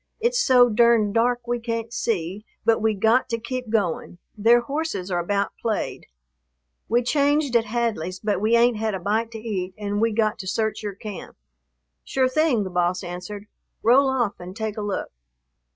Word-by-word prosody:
It's 485 +2 +1
so 250 - +6
durned 230 -2 +3
dark 240 +1 +1
we 240 0 -1
can't 230 0 -4
see, 195 -3 -2 0.2
but 225 0 +3
we 220 -1 +2
got 225 +7 +2
to 230 - -1
keep 250 +1 -5
going; 195 -5 -1 0.2
their 230 +3 +5
horses 240 - -3
are 175 - +1
about 200 +3 -1
played. 220 -2 -3 0.8
We 240 +2 +2
changed 285 0 +1
at 230 -1 +4
Hadley's, 210 -6 -2
but 205 -3 -1
we 220 +2 +3
ain't 235 -1 +4
had 220 -1 -1
a - - -4
bite 215 +5 0
to - - -5
eat 190 -5 -4
and 205 0 -2
we 230 0 +3
got 215 0 0
to 190 - -6
search 220 +3 -1
your 205 -2 -5
camp." 200 -2 -8 0.7
"Sure 260 -1 +1
thing," 260 -4 +2
the 190 - -6
boss 180 +1 0
answered, 180 +4 -7 0.4
"roll 265 +4 +5
off 240 -6 -1
and 180 +1 -9
take 220 -1 -3
a 215 - -4
look. 205 -1 -3
220 Hz, 185 wpm, -23 LUFS, 200-240 Hz, 0.8 s, so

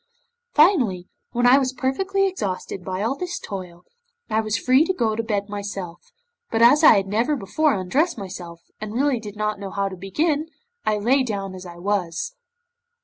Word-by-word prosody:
Finally, 255 - +4 0.2
when 245 +1 0
I 255 +3 +7
was 260 -1 -1
perfectly 385 +11 0
exhausted 195 - -4
by 185 +1 -3
all 235 +5 0
this 355 +4 -4
toil, 180 -3 -7 0.5
I 220 +1 +2
was 215 0 -1
free 255 +5 +4
to 375 - 0
go 220 -8 +1
to 230 - 0
bed 205 -3 -2
myself, 200 -4 -6 0.4
but 225 - 0
as 245 +7 +6
I - - +9
had 195 -1 +2
never 230 +9 +1
before 285 +5 +1
undressed 260 - 0
myself, 175 -3 -8 0.2
and 215 0 -6
really 270 -1 +2
did 210 -2 -9
not 210 -1 -2
know 200 -1 -5
how 200 0 -1
to 190 - -7
begin, 295 - -1 0.4
I 215 -1 +2
lay 250 +7 +3
down 200 -6 -3
as 185 -1 -9
I 175 - -10
was. 180 - -2
215 Hz, 185 wpm, -23 LUFS, 195-265 Hz, 0.5 s, I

